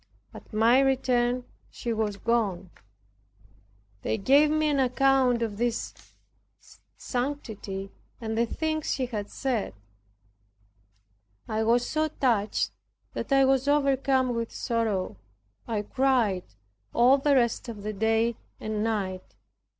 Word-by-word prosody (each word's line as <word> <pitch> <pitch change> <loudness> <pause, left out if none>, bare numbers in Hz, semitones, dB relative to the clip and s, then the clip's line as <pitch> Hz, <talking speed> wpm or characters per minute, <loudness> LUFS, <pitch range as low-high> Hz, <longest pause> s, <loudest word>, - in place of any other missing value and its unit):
At - - -12
my 230 +4 +4
return 250 -2 +2 0.3
he 235 - -4
was 215 -2 -1
gone. 200 -6 -1 1.3
They - - -1
gave 280 +8 +5
me 310 0 +2
an 290 -2 +1
account 260 -2 +3
of 210 -2 -4
his 240 -1 -1 1.0
sanctity, 220 -7 -4 0.3
and 220 -2 -3
the 230 +1 +1
things 315 +3 -2
he 265 - -1
had 215 -5 -5
said, 240 - -2 1.7
I 215 0 -1
was 235 +2 +2
so 310 0 0
touched 235 -9 0 0.4
that - - -5
I 270 0 +5
was 270 0 +2
overcome 270 -3 +2
with 230 -1 -3
sorrow. 220 - -1 0.5
I 215 -3 -1
cried 235 -6 +1 0.5
all 255 +4 +5
the 280 +1 +3
rest 240 -1 +1
of 210 -3 -7
the 215 0 -3
day 225 +2 +1 0.2
and 215 -1 -2
night. 190 - -3
235 Hz, 120 wpm, -27 LUFS, 215-270 Hz, 1.7 s, gave